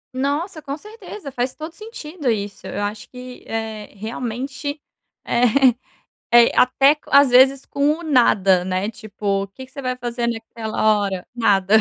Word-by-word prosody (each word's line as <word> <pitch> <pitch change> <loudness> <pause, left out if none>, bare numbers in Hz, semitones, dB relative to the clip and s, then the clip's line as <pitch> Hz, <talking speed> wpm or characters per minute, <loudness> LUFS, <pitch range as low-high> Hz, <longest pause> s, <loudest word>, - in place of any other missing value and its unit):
Nossa, 295 +6 -2
com 280 0 -5
certeza. 420 -5 -10
Faz 250 0 -2
todo 315 +1 -7
sentido 335 - -6
isso. 205 -3 -3
Eu 205 - -3
acho 205 +1 -5
que, 250 0 -10
eh, 220 -1 -5
realmente 255 +7 -5 0.5
é 235 - +1 0.9
é 235 0 +6
até 270 +4 +5
às 280 -2 +6
vezes 260 +2 +5
com 280 +1 +1
o - - -9
nada, 200 - +3
né, 185 +2 -1
tipo: 205 -2 -3
"O 195 - -6
que 260 +7 -11
que 260 - -25
você 275 - -7
vai 255 -1 -2
fazer 240 -1 -2
naquela 220 -2 0
hora?" 190 -2 -3
"Nada." 205 -4 +2
245 Hz, 160 wpm, -21 LUFS, 215-280 Hz, 0.9 s, é